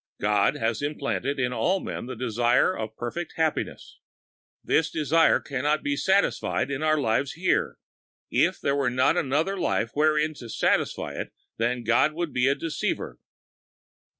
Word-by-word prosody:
God 105 0 +2
has 115 +1 -1
implanted 145 -1 -2
in 125 -1 0
all 190 +8 +1
men - - -6
the 130 - -5
desire 120 - +2
of 110 0 -6
perfect 140 +9 -5
happiness. 160 -2 -2 0.6
This 160 0 +2
desire 160 +1 +3
can 135 -3 -4
not 150 +2 +1
be 145 0 0
satisfied 190 -4 +1
in 135 +1 -3
our 155 -1 +2
lives 135 +1 0
here. 180 +3 0 0.5
If - - +2
there 140 - 0
were 140 -3 +1
not 130 +2 +2
another 155 +9 0
life 115 -9 0
wherein 155 +1 +2
to 120 - -9
satisfy - - 0
it - - -5 0.3
then 120 +1 -1
God 115 +7 +3
would 170 -1 -3
be 125 +1 +2
a 140 - +3
deceiver. 160 -2 -3
140 Hz, 155 wpm, -26 LUFS, 125-155 Hz, 0.6 s, desire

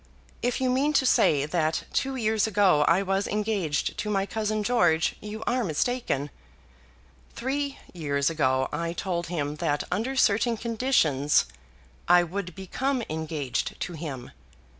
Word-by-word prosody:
If 245 0 0
you 260 -1 +1
mean 280 +4 +2
to 275 - +3
say 145 - +4
that 160 0 0
two 270 0 0
years 220 -3 +1
ago 195 -8 +4
I 185 +3 +4
was 195 +1 0
engaged 205 -7 -1
to 210 - -2
my 195 -2 +1
cousin 215 0 -2
George 175 -9 +2
you 210 +1 -6
are 250 0 +1
mistaken. 160 - -1 1.0
Three 275 +2 -2 0.2
years 140 -5 -1
ago 130 -5 +1
I 165 +2 -2
told 175 -1 -3
him 150 -3 -3
that 150 -3 0
under 250 +6 -1
certain 230 -1 +3
conditions 215 - +2 0.6
I 175 0 +6
would 180 0 -5
become 250 +7 -2
engaged 155 -4 -3
to 180 - -3
him. 145 -6 -6
195 Hz, 140 wpm, -26 LUFS, 155-230 Hz, 1.0 s, I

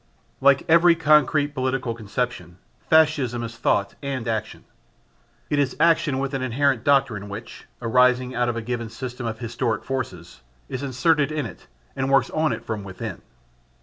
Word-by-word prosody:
Like 140 0 +4
every 170 +1 +6
concrete 150 -2 +3
political 130 -3 -1
conception, 110 -5 -4 0.3
Fascism 145 -7 +3
is 115 0 -6
thought 100 -3 0
and 135 -4 -4
action. 110 -2 -3 0.9
It 145 - +2
is 135 -3 0
action 160 -4 +3
with 135 +1 -2
an 135 - -2
inherent 130 0 +1
doctrine 120 -8 +2
which, 110 +4 -9 0.2
arising 125 +1 +3
out 120 0 0
of 120 - -2
a 115 - -4
given 120 -1 -3
system 125 +1 -6
of 110 0 -4
historic 115 -1 -2
forces, 90 - -5 0.3
is 130 - -5
inserted 140 +3 +1
in 150 -3 -2
it 95 - -10 0.3
and 135 0 -1
works 135 -2 +3
on 155 0 +1
it - - -5
from 110 -3 -4
within. 95 -2 -7
125 Hz, 160 wpm, -23 LUFS, 115-140 Hz, 0.9 s, every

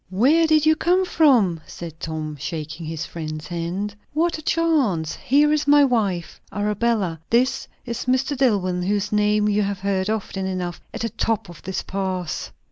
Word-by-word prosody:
"Where 275 - +4
did 310 -1 +4
you 315 0 +5
come 360 +4 +2
from?" 240 - +3
said 165 -2 -9
Tom, 155 -1 -4
shaking 155 +3 -5
his 160 0 -4
friend's 155 -2 -6
hand. 175 +4 -3 0.2
"What 325 +1 +1
a - - -8
chance! 280 - +1
Here 295 +3 +3
is 300 -1 0
my 290 0 +7
wife. 205 -9 -1
Arabella, 210 -4 0
this 255 +3 +2 0.2
is 235 -1 -4
Mr. 260 +3 +1
Dillwyn, 200 -9 +1
whose 205 +2 0
name 210 0 +2
you 210 0 +2
have 200 -2 -2
heard 195 0 0
often 195 -3 -2
enough. 180 -2 -4
At - - -6
the 230 - -1
top 225 -4 -1
of 175 - -12
this 190 - -4
pass! 185 -3 -3
205 Hz, 170 wpm, -22 LUFS, 175-260 Hz, 0.2 s, my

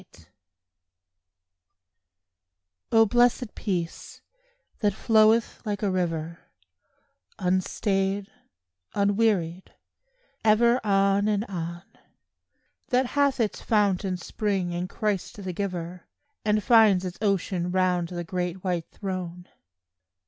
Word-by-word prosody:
PEACE 80 - -21 2.7
O 225 -1 +6
blessed 240 +1 +2
peace, 175 -5 -4 0.6
that 205 -4 +1
floweth 225 0 +3
like 210 -2 -3
a 200 - +1
river, 165 -2 -2 1.0
Unstayed, 195 +2 0 0.7
unwearied, 200 -4 0 0.7
ever 235 +3 +4
on 200 0 +2
and 210 0 0
on; 170 -3 -6 1.0
That 255 0 +2
hath 280 +1 +1
its 220 -3 -1
fount 205 -4 +2
and 185 -2 -2
spring 195 -1 -2
in 175 +1 -3
Christ 205 -1 -2
the 185 -1 -4
giver, 180 -2 -5 0.4
And 210 0 +1
finds 210 -5 +5
its 180 0 -6
ocean 190 -3 0
round 180 -1 +1
the 175 0 -5
great 180 +1 -4
white 175 -3 -2
Throne. 180 -3 -6
195 Hz, 100 wpm, -26 LUFS, 180-215 Hz, 2.7 s, O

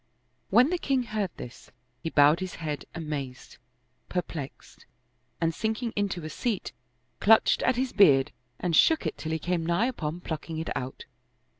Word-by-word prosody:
When 245 - +5
the 360 - 0
king 270 -5 +1
heard 215 -4 -2
this, 120 - -10 0.3
he 165 - -3
bowed 150 +2 +5
his 185 -1 -5
head 150 -3 -4
amazed, 145 -6 -6 0.5
perplexed, 165 -6 -6 0.5
and 165 0 +1
sinking 220 +5 -2
into 195 -5 -2
a - - -4
seat, 225 - -2 0.5
clutched 220 +1 +5
at 255 - +2
his 255 +1 -1
beard 140 -10 +5 0.3
and 175 -3 0
shook 320 - +4
it - - -2
till 160 - -5
he 160 - 0
came 175 +1 -1
nigh 170 +7 +1
upon 175 -9 -3
plucking 160 -1 -5
it 160 - -3
out. 130 +1 -5
170 Hz, 160 wpm, -27 LUFS, 155-220 Hz, 0.5 s, When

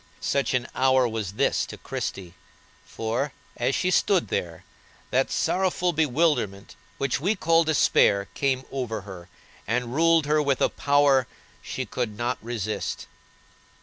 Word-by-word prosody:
Such 140 -2 0
an 125 0 -1
hour 130 -1 +3
was 110 -4 -4
this - - +1
to - - -9
Christie, 90 -3 -5 0.5
for, 120 +6 -2 0.2
as 125 +3 0
she 185 - 0
stood 185 -1 +2
there, 85 -2 -3 0.5
that - - +2
sorrowful 180 -1 0
bewilderment 145 - 0 0.2
which 140 0 -1
we 195 +9 +1
call 165 -2 +3
despair 130 -9 +3
came 135 -2 0
over 125 -6 -3
her, 95 -3 -11 0.4
and 120 +1 -1
ruled 165 +1 +4
her 150 +1 +2
with 140 -3 +1
a - - +3
power 140 -3 +3 0.3
she - - -4
could 110 -5 -4
not 120 +2 -2
resist. 110 -2 -4
130 Hz, 140 wpm, -25 LUFS, 110-150 Hz, 0.5 s, ruled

